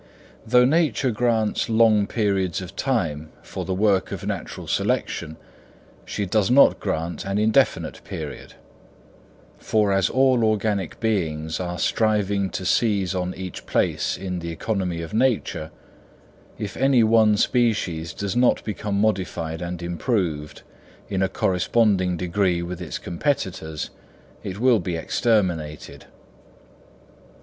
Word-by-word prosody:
Though 125 Hz, +2 st, +5 dB
nature 150 Hz, -2 st, +2 dB
grants 110 Hz, -1 st, 0 dB
long 110 Hz, -2 st, +4 dB
periods 100 Hz, -6 st, 0 dB
of 95 Hz, +1 st, -8 dB
time 80 Hz, -, -1 dB
for -, -, -6 dB
the 95 Hz, -, -2 dB
work 100 Hz, -1 st, +2 dB
of -, -, -5 dB
natural -, -, -5 dB
selection, 80 Hz, 0 st, -1 dB, 0.7 s
she 100 Hz, -, -3 dB
does 100 Hz, +1 st, +1 dB
not 135 Hz, +3 st, +6 dB
grant 85 Hz, +2 st, -3 dB
an 100 Hz, +1 st, -2 dB
indefinite 110 Hz, +1 st, +1 dB
period; -, -, -7 dB, 1.0 s
for 105 Hz, -2 st, +1 dB
as 95 Hz, -2 st, +2 dB
all 130 Hz, -2 st, +3 dB
organic 105 Hz, -3 st, 0 dB
beings 80 Hz, -8 st, -1 dB
are 90 Hz, -1 st, -3 dB
striving 100 Hz, -1 st, +1 dB
to 95 Hz, -, -5 dB
seize 100 Hz, -3 st, +1 dB
on 90 Hz, 0 st, -2 dB
each 95 Hz, -2 st, -7 dB
place -, -, 0 dB
in 90 Hz, -1 st, -4 dB
the 85 Hz, 0 st, -5 dB
economy 90 Hz, -1 st, -2 dB
of 85 Hz, -, -8 dB
nature, 110 Hz, -9 st, 0 dB, 0.9 s
if 100 Hz, -2 st, -5 dB
any 135 Hz, -3 st, +4 dB
one 110 Hz, -1 st, +4 dB
species 100 Hz, -9 st, +1 dB
does 100 Hz, +4 st, -4 dB
not 125 Hz, 0 st, +3 dB
become 105 Hz, -1 st, -3 dB
modified 90 Hz, -6 st, -1 dB
and 85 Hz, 0 st, -5 dB
improved 85 Hz, -, -2 dB, 0.5 s
in 95 Hz, -2 st, -1 dB
a 95 Hz, -, +2 dB
corresponding 95 Hz, -1 st, +1 dB
degree 90 Hz, 0 st, 0 dB
with 90 Hz, +1 st, -6 dB
its 90 Hz, -, -4 dB
competitors 85 Hz, -, -3 dB, 0.5 s
it 95 Hz, +1 st, -6 dB
will 125 Hz, -2 st, +4 dB
be 90 Hz, -1 st, -3 dB
exterminated. 85 Hz, -5 st, -1 dB
100 Hz, 125 wpm, -23 LUFS, 90-110 Hz, 1.0 s, not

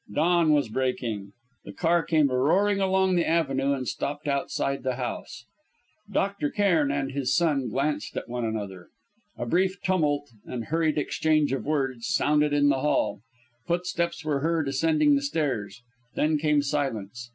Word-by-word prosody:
Dawn 170 Hz, +6 st, +3 dB
was 145 Hz, -4 st, +3 dB
breaking. 115 Hz, -4 st, -2 dB, 0.3 s
The 100 Hz, -, -9 dB
car 170 Hz, -, +2 dB
came 155 Hz, -4 st, +2 dB
roaring 185 Hz, +11 st, +2 dB
along 190 Hz, -1 st, +2 dB
the 175 Hz, -2 st, +1 dB
avenue 140 Hz, -4 st, +1 dB
and 130 Hz, -2 st, -3 dB
stopped 145 Hz, +1 st, -4 dB
outside 140 Hz, -1 st, -1 dB
the 130 Hz, -1 st, -1 dB
house. 120 Hz, -2 st, -6 dB, 0.7 s
Dr. 200 Hz, -5 st, 0 dB
Cairn 170 Hz, -8 st, +2 dB
and 135 Hz, -1 st, -2 dB
his 135 Hz, -2 st, 0 dB
son 145 Hz, -7 st, +1 dB
glanced 140 Hz, +6 st, -2 dB
at -, -, -4 dB
one 120 Hz, 0 st, -3 dB
another. 100 Hz, -5 st, -4 dB, 0.5 s
A -, -, -3 dB
brief 185 Hz, +8 st, +1 dB
tumult 145 Hz, -6 st, 0 dB
and 120 Hz, -2 st, -5 dB
hurried 160 Hz, -1 st, 0 dB
exchange 155 Hz, -1 st, +1 dB
of 135 Hz, -, -3 dB
words 135 Hz, -6 st, -1 dB
sounded 150 Hz, -5 st, +2 dB
in 145 Hz, 0 st, +3 dB
the 135 Hz, -2 st, +2 dB
hall; 150 Hz, -7 st, 0 dB, 0.5 s
footsteps 170 Hz, -1 st, -1 dB
were 145 Hz, -2 st, 0 dB
heard 160 Hz, 0 st, 0 dB
ascending 150 Hz, +2 st, +3 dB
the 140 Hz, -, +1 dB
stairs, 130 Hz, -8 st, -2 dB, 0.3 s
then 155 Hz, 0 st, +1 dB
came 150 Hz, -1 st, +2 dB
silence. 125 Hz, -5 st, -3 dB
145 Hz, 155 wpm, -26 LUFS, 130-165 Hz, 0.7 s, Dawn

